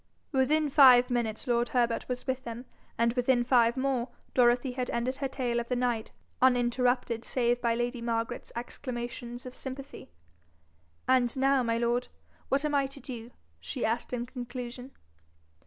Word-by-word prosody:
Within 300 +3 +2
five 255 -3 +7
minutes 230 -3 -1
lord 240 -1 +1
Herbert 235 -1 0
was 250 0 -3
with 260 0 -2
them, 235 +1 -7 0.3
and 235 0 +2
within 245 0 +2
five 240 -1 +3
more, 260 -2 0 0.2
Dorothy 245 +1 +3
had 250 0 -3
ended 250 +3 -1
her 275 - -1
tale 245 -3 -1
of 235 - -5
the 250 - +1
night, 240 -3 -1 0.3
uninterrupted 245 -2 +2
save 240 0 0
by 235 -1 +2
lady 240 +1 -2
Margaret's 230 -1 -2
exclamations 240 0 -6
of 250 - -7
sympathy. 270 +1 -8 1.0
'And 255 -1 +3
now, 270 0 +3
my 230 -1 0
lord, 240 +1 0 0.4
what 280 +3 +1
am 300 - -1
I 280 -1 +2
to 275 +1 -11
do?' 240 -3 -8 0.3
she 80 - -3
asked 230 +2 -1
in 240 -1 -2
conclusion. 250 0 -7
245 Hz, 155 wpm, -29 LUFS, 235-260 Hz, 1.0 s, five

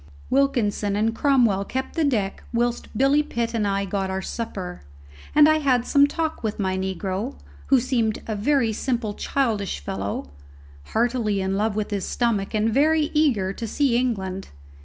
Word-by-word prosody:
Wilkinson 235 -7 +1
and 220 +2 +1
Cromwell 235 -7 +3
kept 260 +6 -4
the 325 - 0
deck 215 -9 0
whilst 240 0 -1
Billy 275 +3 +4
Pitt 235 -6 -3
and 215 -3 0
I 200 0 0
got 195 0 -2
our 190 0 -2
supper, 190 -6 -5 0.5
and 300 0 +8
I 310 0 +4
had 255 -5 +2
some 285 0 +5
talk 320 0 -3
with 220 -1 -2
my 190 -2 0
negro, 190 +5 -3 0.3
who 270 - +5
seemed 235 -3 0
to - - -9
be - - -7
a - - -1
very 230 +1 +1
simple 230 -2 -2
childish 215 - -1
fellow, 95 -2 -4 0.5
heartily 230 - 0
in 190 0 -1
love 210 +1 0
with 215 0 -2
his 200 -2 -2
stomach 220 -4 0
and 215 +1 +2
very 305 +3 +3
eager 240 -12 +2
to 230 +2 -5
see 270 +1 +1
England. 195 -6 -1
225 Hz, 175 wpm, -24 LUFS, 200-265 Hz, 0.5 s, and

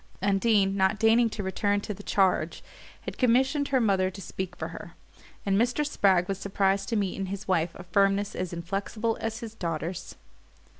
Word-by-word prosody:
Undine, 195 0 +2
not 190 +1 +2
deigning 225 +2 +4
to 210 -1 -5
return 205 +2 0
to 210 - -4
the 205 - -11
charge, 185 -5 +1 0.4
had - - -7
commissioned 265 +4 +3
her 265 -2 +2
mother 195 -5 +2
to 190 - -10
speak 185 -1 -5
for 160 - -5
her; 170 +1 -10 0.5
and 195 0 +2
Mr. 245 +5 +1
Spragg 190 -10 +2
was 195 -1 -3
surprised 195 0 0
to 230 - 0
meet 200 -3 0
in 195 -1 -3
his 200 +1 -6
wife 170 -3 +1
a - - -9
firmness 195 +3 +2
as 180 -1 -3
inflexible 195 +6 -2
as 225 +1 -3
his 225 -2 -7
daughter's. 170 -2 -4
195 Hz, 185 wpm, -27 LUFS, 185-220 Hz, 0.5 s, deigning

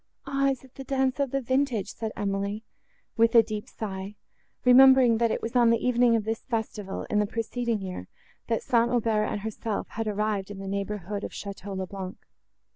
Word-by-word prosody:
"Ah! 275 0 +1
is 265 -2 -3
it 260 -1 -17
the 270 - -8
dance 265 0 0
of 280 -1 +1
the 275 +2 -1
vintage?" 260 -5 0
said 220 -1 -4
Emily, 200 +1 -2 0.5
with 230 +1 +4
a 230 - +9
deep 215 -2 -5
sigh, 195 -1 -6 0.5
remembering, 255 -2 +7
that 235 -1 +3
it - - -2
was 230 +2 -4
on 240 -2 +5
the 230 - +4
evening 240 0 +3
of 225 - +1
this 225 +1 -3
festival, 215 -5 -4
in 210 - +3
the 210 - +1
preceding 230 +1 -2
year, 180 - -6 0.4
that 230 -2 0
St. 235 -1 +3
Aubert 225 -3 +1
and 205 - -3
herself 220 0 -4
had 225 0 -4
arrived 210 -1 -1
in 205 - -7
the 195 0 -7
neighbourhood 200 0 -3
of - - -3
Château 200 -1 -7
le 190 - -2
Blanc. 190 -1 -7
225 Hz, 200 wpm, -27 LUFS, 205-245 Hz, 0.5 s, a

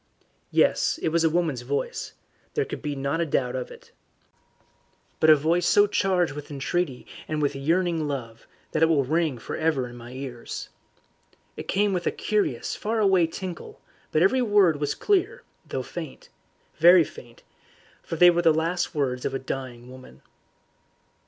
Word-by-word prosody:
Yes, - - +2
it - - +2
was 165 +1 +1
a 165 - +4
woman's 160 -6 0
voice; 140 +4 -3 0.4
there - - +1
could - - -7
not 140 +1 -2
be - - -1
a - - -4
doubt 125 -3 0
of 125 -1 -4
it. - - -15 1.3
But 155 - +4
a 155 - +9
voice 165 +4 +1
so 205 - +5
charged 185 -5 +1
with 145 0 -8
entreaty 145 0 -2 0.2
and 155 - -2
with 145 -1 0
yearning 165 +2 0
love, 115 -5 -6 0.2
that - - -1
it 160 - +6
will 155 -4 +3
ring 155 0 0
for 115 - -6
ever 155 -6 0
in 120 - -11
my 120 +1 -10
ears. 130 -3 -7 0.9
It - - -8
came 205 0 +1
with 180 -2 -2
a - - +2
curious 210 -1 -1
faraway 200 -6 +2
tinkle, 180 +1 -7 0.3
but 155 - +3
every 255 +7 +3
word 205 -9 +3
was 145 -1 -1
clear, 415 +5 0 0.2
though - - -3
faint - - -8 0.5
very 175 +1 +7
faint, 120 -5 -13 0.6
for - - -5
they 175 +2 +7
were 175 0 +1
the 165 -1 +5
last 165 +3 -1
words 130 -4 -1
of 135 - -2
a - - +1
dying 130 -2 -6
woman. 130 - -14
160 Hz, 170 wpm, -25 LUFS, 135-175 Hz, 1.3 s, a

